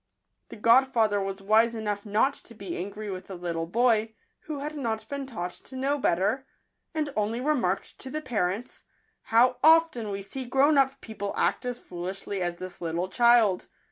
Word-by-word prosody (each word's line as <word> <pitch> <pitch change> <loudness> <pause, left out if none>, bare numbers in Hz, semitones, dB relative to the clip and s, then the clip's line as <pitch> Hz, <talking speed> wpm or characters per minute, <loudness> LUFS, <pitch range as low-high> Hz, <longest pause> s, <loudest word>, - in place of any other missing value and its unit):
The - - -9
godfather 230 -2 +4
was 195 0 -4
wise 225 +3 +4
enough 210 -1 -3
not 220 +7 +2
to 230 - -11
be 195 -5 -6
angry 205 +3 -5
with 185 -1 -7
the 195 - -7
little 170 -2 -3
boy, 225 +1 +2 0.3
who 305 -2 -4
had 295 +2 -4
not 230 -6 -3
been 280 -1 -5
taught 180 -8 -4
to 260 - -12
know 275 +3 0
better, 225 +7 +1 0.5
and 300 -3 -1
only 215 +3 0
re 295 +4 +2
marked 195 -8 -2
to 265 - -6
the 305 - -3
parents, 220 -5 -3 0.2
" - - -44
How 245 +2 +5
often 320 -8 +5
we 200 0 -4
see 255 +7 -6
grown 275 +5 +3
up 270 -1 +2
people 205 -2 -5
act 250 - +1
as 245 -1 -3
foolishly 185 +2 -5
as 175 -1 -1
this 185 0 -8
little 170 +2 -2
child 235 -3 +4
220 Hz, 185 wpm, -27 LUFS, 195-260 Hz, 0.5 s, How